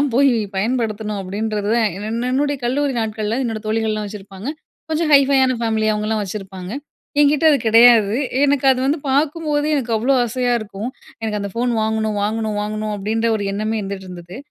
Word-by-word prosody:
WhatsAppலாம் 285 - +2
போய் 275 +1 +5 0.3
பயன்படுத்தணும். 215 -2 -1
அப்டின்றத 205 +2 -3
தான் 225 -2 +3
என் 220 +3 -3
என்னுடைய 285 +1 +1
கல்லூரி 275 +3 0
நாட்கள்ல 220 +1 -2
என்னோட 225 -2 -3
தோழிகள்லா 215 -1 -1
வச்சிருப்பாங்க. 200 +2 -8 0.4
கொஞ்சம் 315 0 0
ஹைஃபையான 270 -2 +5
ஃபேமிலி 220 -1 +1
அவுங்ளா 215 +1 -1
வச்சிருப்பாங்க. 190 -1 -7 0.5
என்கிட்ட 295 +2 +3
அது 285 - +4
கிடையாது. 225 -1 +6 0.3
எனக்கு 280 -1 +2
அது 255 - -2
வந்து 295 +4 +1
பார்க்கும்போதே 300 +1 0
எனக்கு 240 -4 -2
அவ்வளோ 250 +5 +2
ஆசையா 245 +1 -1
இருக்கும். 210 +2 -6 0.3
எனக்கு 215 -2 -2
"அந்த 200 - -4
ஃபோன் 240 +1 0
வாங்கணும் 220 -1 -1
வாங்கணும் 215 0 -1
வாங்கணும்" 215 0 -3
அப்டின்ற 220 +3 -1
ஒரு 205 - -3
எண்ணமே 215 +2 -2
இருந்துட்டு 195 -1 -6
இருந்தது. 175 +1 -9
220 Hz, 160 wpm, -20 LUFS, 210-260 Hz, 0.5 s, கிடையாது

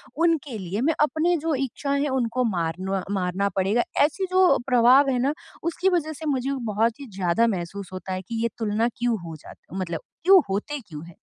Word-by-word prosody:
उनके 310 -6 +1
लिए 190 +2 -4
मैं 315 +5 +2
अपने 315 +4 +2
जो 320 0 -1
इच्छाएँ 275 +1 -2
हैं 285 +1 0
उनको 255 -1 0
मारनो 185 -1 -1
मारना 190 +1 0
पड़ेगा। 200 +5 +2 0.2
ऐसी 320 +6 0
जो 370 -1 +5
प्रभाव 255 +2 +5
है 255 - +1
ना 270 +4 +1 0.3
उसकी 340 +3 +1
वज़ह 325 -4 0
से 315 +1 -9
मुझे 270 -2 0 0.2
बहुत 225 +4 +1
ही 280 - -8
ज़्यादा 190 +5 +2
महसूस 190 -1 -4
होता 185 0 -5
है 185 - -3
कि 225 +4 -5
ये 235 - +1
तुलना 220 +1 +1
क्यों 240 -2 0
हो 165 -1 -7
जात - - -12 0.2
मतलब 180 -4 -3 0.2
क्यों 380 +1 +7
होते 210 +10 -2
क्यों 155 -1 -8
है? 170 -1 -14
235 Hz, 195 wpm, -24 LUFS, 190-290 Hz, 0.3 s, क्यों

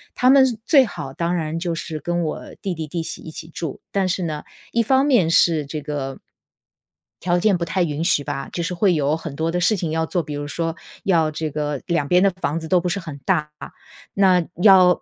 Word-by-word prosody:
他 250 - +3
们 270 0 +7
是 240 -4 -3
最 275 -1 +6
好 135 - -7
当 170 +4 -1
然 160 -1 -2
就 170 -1 -2
是 160 -1 -5
跟 175 +2 -1
我 155 - -3 0.2
弟 195 - -2
弟、 160 -2 -5
弟 165 +2 -3
媳 - - -6
一 - - -9
起 155 - -9
住， 160 -3 -6
但 195 -2 +1
是 185 0 -1
呢， 155 -3 -3 0.3
一 235 - +2
方 265 +4 +3
面 245 - +3
是 165 -2 +3
这 150 +2 -5
个 140 -2 -4 1.0
条 175 0 +1
件 195 0 +3
不 170 - -2
太 180 +2 0
允 155 -1 -2
许 150 -3 +2
吧， 135 0 -4
就 175 - -3
是 180 +2 -2
会 185 +1 +3
有 150 -1 +1
很 165 -3 -7
多 160 +2 -1
的 180 - -1
事 200 +5 +3
情 170 -3 -3
要 160 0 0
做。 175 +2 -1
比 150 0 -7
如 145 0 -4
说 165 +3 -2 0.3
要 165 -5 +2
这 155 +1 -3
个 150 -1 -3
两 170 -4 0
边 180 +4 +4
的 195 - +5
房 175 -4 -3
子 160 - -7
都 180 +2 +3
不 175 +1 -2
是 200 - -1
很 160 -6 -8
大， 155 -5 +1 0.6
那 185 -3 +4 0.2
要 185 -3 +6
170 Hz, 250 characters per minute, -21 LUFS, 155-185 Hz, 1.0 s, 们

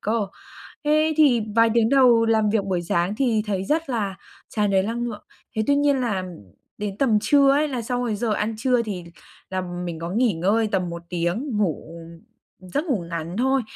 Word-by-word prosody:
cơ. 215 0 0 0.6
Thế 310 +1 +3
thì 260 -7 +5
vài 230 0 +5
tiếng 230 -1 +3
đầu 245 -4 +5
làm 220 -2 +2
việc 210 -2 +1
buổi 185 -3 -1
sáng 175 +3 0
thì 230 -4 +1
thấy 195 -2 -1
rất 310 +6 -1
là 205 -6 -2 0.3
tràn 210 -2 0
đầy 190 -1 +3
lăng 230 +3 -2
lượng. 225 -4 -6 0.3
Thế 220 - +1
tuy 285 - +4
nhiên 285 -2 +2
là 205 -7 -1 0.5
đến 205 -1 -4
tầm 230 -5 +3
trưa 280 -1 +4
ấy 295 +2 +2
là 255 -4 -3
sau 245 +2 -2
cái 220 -3 -1
giờ 220 +1 -1
ăn 215 +2 -2
trưa 245 +1 +2
thì 195 -6 -5 0.5
là 185 0 -2
mình 175 -2 -5
có 170 +1 -4
nghỉ 230 +2 +2
ngơi 205 +7 +1
tầm 185 -3 0
1 170 0 -7
tiếng 175 - -2
ngủ, 165 -5 -2
ừm, 165 0 -13 0.5
giấc 295 +4 0
ngủ 240 - -1
ngắn 170 +2 -4
thôi. 265 +2 +2
220 Hz, 205 wpm, -23 LUFS, 190-250 Hz, 0.6 s, thì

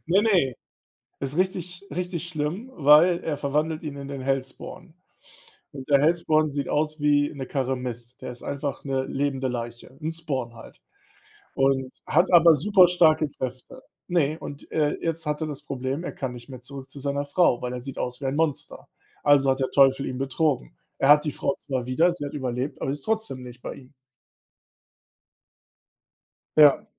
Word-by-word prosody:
Ne, 185 +5 +4
ne, 180 - +3 0.7
ist 140 +1 -3
richtig 185 -2 0
sch 180 +2 -9
richtig 180 -2 -3
schlimm, 175 - -3
weil 155 +4 +6
er 150 -3 -2
verwandelt 150 +3 -1
ihn 150 -3 -6
in 140 - -7
den 140 -1 -5
Hellspawn. 135 +4 -4 0.8
Und 135 -2 -9
der 140 -1 +5
Hellspawn 155 0 +3
sieht 140 -1 -3
aus 155 +1 -1
wie 145 0 +3
'ne 135 -2 -5
Karre 135 -1 -1
Mist. 120 -1 -7
Der - - -5
ist 125 - -10
einfach 140 0 -4
'ne 135 -2 -1
lebende 135 -1 -1
Leiche, 120 +1 -6
'n 160 +1 -3
Spawn 135 -8 -3
halt. 115 - -14 0.8
Und 135 -1 +1
hat 185 - +2
aber 165 -1 +8
super 185 +4 +5
starke 160 -3 +4
Kräfte. 130 -2 -7 0.3
Ne, 160 -3 +1
und, 145 - -9
äh, 150 -2 +1
jetzt 165 -1 -2
hat 150 +1 -2
er 160 - -1
das 145 -2 -7
Problem, 135 +4 -3
er - - -3
kann 130 -2 -4
nicht 120 -1 -11
mehr 130 -2 -9
zurück 135 +1 -9
zu 140 - -10
seiner 140 +1 -2
Frau, 145 -3 +2
weil 125 0 -3
er 125 - -5
sieht 135 +1 -7
aus 125 +2 -3
wie - - -4
ein 135 +1 -1
Monster. 150 -2 -2 0.4
Also 140 -2 +5
hat 135 0 +1
der 130 - 0
Teufel 135 0 +4
ihn 130 - -4
betrogen. 135 - -1 0.2
Er 135 - +3
hat 150 +1 +7
die 150 - 0
Frau 140 - -1
zwar 130 -3 -3
wieder, 160 +8 +2
sie 160 -4 -5
hat 140 - -6
überlebt, 130 -1 -3
aber 135 - -1
ist 145 +1 -4
trotzdem 220 -12 -1
nicht 125 -1 -11
bei - - -5
ihm. 130 0 -15 2.6
Ja. 150 -2 +7
140 Hz, 185 wpm, -25 LUFS, 130-155 Hz, 2.6 s, aber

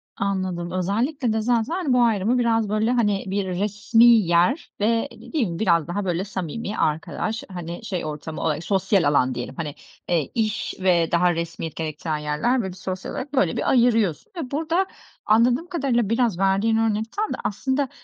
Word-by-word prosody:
Anladım. 185 -3 -2
Özellikle 225 - 0
de 220 - 0
zaten 245 - 0
bu 250 - +4
ayrımı 225 +2 +2
biraz, 225 -3 +1
böyle, 215 +3 +1
hani, 210 -5 +1
bir 195 +1 -1
resmî 205 +5 +2
yer 215 - +4
ve 230 +5 +1
değil 290 -9 -3
mi 170 -1 -5
biraz 170 -6 +2
daha, 195 +3 -3
böyle, 175 0 0
samimi 195 +2 -5
arkadaş, 160 +8 -1
hani, 175 +3 -6
şey 185 -6 -3
ortamı 155 +1 -6
olar 155 -1 0
sosyal 190 +1 +1
alan 130 -3 +2
diyelim, 120 - -5
hani, 150 -3 -5 0.3
eee, 165 -6 0
iş 215 -2 -1
ve 175 -3 +3
daha 175 +1 +3
resmiyet 165 -1 -4
gerektiren 155 0 -3
yerler, 150 +13 0
böyle, 190 -3 -4
bir 180 - -12
sosyal 185 0 -5
olarak, 275 +2 -6
böyle, 195 - +2
bir - - 0
ayırıyorsun 230 - +2
ve 275 -7 -5
burada 325 +6 +1 0.4
anladığım 240 +8 +3
kadarıyla 265 - 0
biraz 230 -6 +1
verdiğin 195 +4 +2
örnek 220 -1 +1
tam 425 +1 -2
da - - -4
aslında 265 +6 -1
205 Hz, 175 wpm, -23 LUFS, 175-235 Hz, 0.4 s, bu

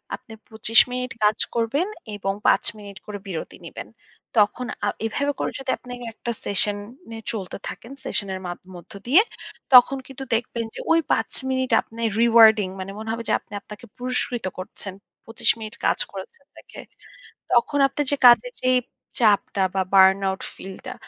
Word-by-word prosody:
আপনি 225 - -14
২৫ 225 -1 +3
মিনিট 250 0 -3
কাজ 210 0 +4 0.2
করবেন 245 - 0 0.3
এবং 195 -1 -2
৫ - - +4
মিনিট 200 -2 -10
করে 210 -1 -6
বিরতি 170 -4 -6
নিবেন। - - -8 0.5
তখন 210 +4 +3 0.2
আ - - +1 0.2
এভাবে 280 +6 0
করে - - -1
যদি 270 - -7
আপনি 250 - -12 0.2
একটা 235 - -5
সেশন-নে 210 - -2
চলতে 195 -5 -5
থাকেন, 230 - -8
সেশনের 190 -2 -1
মাধ 175 - -5 0.2
মধ্য 175 - -13 0.2
দিয়ে 305 +11 +7 0.5
তখন 255 +2 +8
কিন্তু 270 0 -8
দেখবেন 235 0 -2
যে - - -7
ঐ - - +7 0.2
৫ - - +1 0.2
মিনিট 260 -1 0
আপনি 230 +1 -11 0.2
রিওয়ার্ডিং 225 -3 +6
মানে 190 +1 -5
মনে 220 0 -6
হবে 230 0 -3
যে, - - +3
আপনি - - -18
আপনাকে 215 +3 -12
পুরস্কৃত 250 -2 -2
করছেন। 190 +1 -6 0.3
২৫ 225 0 +1
মিনিট 215 -1 -7
কাজ - - +2
করেছেন 195 +8 -10
দেখে। - - -12 0.7
তখন 245 +4 +3
আপনার 295 +1 -3
যে 285 - +1
কাজের - - +5
যেই 255 0 +4 0.4
চাপটা 205 -3 +3
বা 190 - +2
বার্নআউট 190 0 +5
ফিল 190 0 -9
টা, - - -5
225 Hz, 160 wpm, -23 LUFS, 200-250 Hz, 0.7 s, তখন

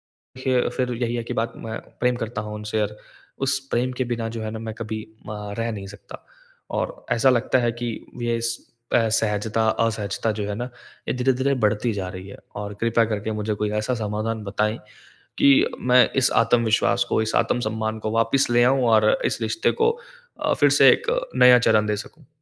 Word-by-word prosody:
देखिए 130 -1 -2
फिर 125 -1 0
यही 120 0 -1
है 120 - -2
कि - - -5
बात 115 +1 -2
मैं 110 0 -5 0.2
प्रेम 125 0 +2
करता 115 -2 -4
हूँ 105 0 -7
उनसे 105 0 -2
और 105 0 -3 0.5
उस 135 0 +1
प्रेम 125 +2 +1
के 130 - +1
बिना 115 -1 -3
जो 115 0 -6
है 110 - -3
ना 110 - -6
मैं 110 0 -5
कभी 110 -1 -5 0.3
अ, 105 -1 -6
रह 115 0 -1
नहीं 100 -3 -6
सकता। 105 +1 -12 0.5
और - - -2 0.2
ऐसा 125 +3 +4
लगता 125 +1 +2
है 120 -1 +1
कि 120 +1 -5 0.3
ये 120 0 0
इस 115 0 -2 0.4
एसहजता 110 -1 +1
असहजता 110 -1 -1
जो 105 -1 -4
है 105 - -3
ना 120 - -3 0.4
ये - - 0
धीरे-धीरे 130 +2 +1
बढ़ती 105 +3 +2
जा 95 -2 -4
रही 95 +1 -8
है। 100 - -10 0.2
और 105 0 -5
कृपया 115 0 +3
करके 110 0 -3
मुझे 105 0 -1
कोई 105 0 -2
ऐसा 115 +4 -1
समाधान 110 0 -3
बताएँ 105 +2 -1 0.6
कि 140 - +6 0.3
मैं 125 0 +5
इस 130 - +3
आत्मविश्वास 115 -1 +2
को, - - +2
इस 110 0 -2
आत्मसम्मान 110 -1 0
को 110 - -3
वापस 115 +5 +2
ले 120 0 +5
आऊँ 130 +1 +3
और 110 -1 +5
इस - - 0
रिश्ते 110 +9 +1
को 455 - +5 0.5
अ, - - +2
फिर - - +4
से - - +7
एक - - 0 0.3
नया 125 0 +7
चरण 110 -2 +3
दे 105 - 0
सकूँ। 145 +7 -11
115 Hz, 200 wpm, -23 LUFS, 105-120 Hz, 0.6 s, से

